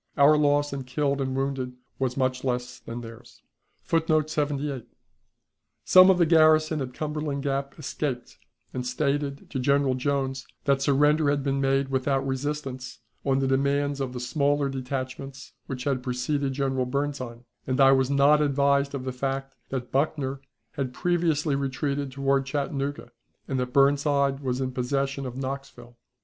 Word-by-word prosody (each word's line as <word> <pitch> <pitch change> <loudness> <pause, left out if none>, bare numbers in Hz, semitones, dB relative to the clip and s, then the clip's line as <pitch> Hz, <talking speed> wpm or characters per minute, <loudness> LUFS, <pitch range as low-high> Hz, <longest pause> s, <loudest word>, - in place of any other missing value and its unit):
Our 145 +1 +7
loss 145 -1 +2
in 135 -2 -5
killed 140 +1 0
and 130 -1 -2
wounded 135 -2 -2 0.3
was 130 -1 -1
much 130 -1 0
less 125 -1 -2
than 120 +1 -7
theirs. 115 -1 -12 0.4
[Footnote 155 -2 +1
78: 145 -4 -2 1.0
Some 185 0 +8
of 190 - +5
the 175 - +4
garrison 155 -1 +4
of 130 -1 -4
Cumberland 150 -1 -3
Gap 140 -1 -2
escaped, 140 -5 -4 0.3
and 125 - -3
stated 140 +2 -1
to 135 - -2
General 140 0 +2
Jones 135 0 -1 0.2
that 140 -1 +3
the - - -11
surrender 150 +2 +3
had 145 -1 0
been 135 0 0
made 135 0 +1
without 135 0 0
resistance, 135 -1 -4 0.3
on 135 -1 +2
the 135 0 +1
demands 140 +1 +1
of 130 -2 -3
the 125 - -5
smaller 140 +2 +1
detachments 135 +1 -5
which 130 -2 -5
had 135 -2 0
preceded 135 +2 -1
General 130 -2 -1
Burnside, 130 -3 -3 0.2
and 130 +1 0
I 135 0 +7
was 130 -1 +3
not 140 +2 +5
advised 140 -1 +2
of 130 - -4
the 130 - -3
fact 135 +1 -3 0.2
that 130 -2 -4
Buckner 135 -1 -1 0.3
had 130 -2 -4
previously 165 -4 +1
retreated 140 +1 -2
toward 135 0 +1
Chattanooga, 140 -2 -3 0.4
and 135 -2 -1
that 125 0 -2
Burnside 140 0 +3
was 130 -2 -2
in 130 -1 -1
possession 135 +2 -1
of 125 0 -7
Knoxville. 135 -3 -6
135 Hz, 160 wpm, -26 LUFS, 130-145 Hz, 1.0 s, Some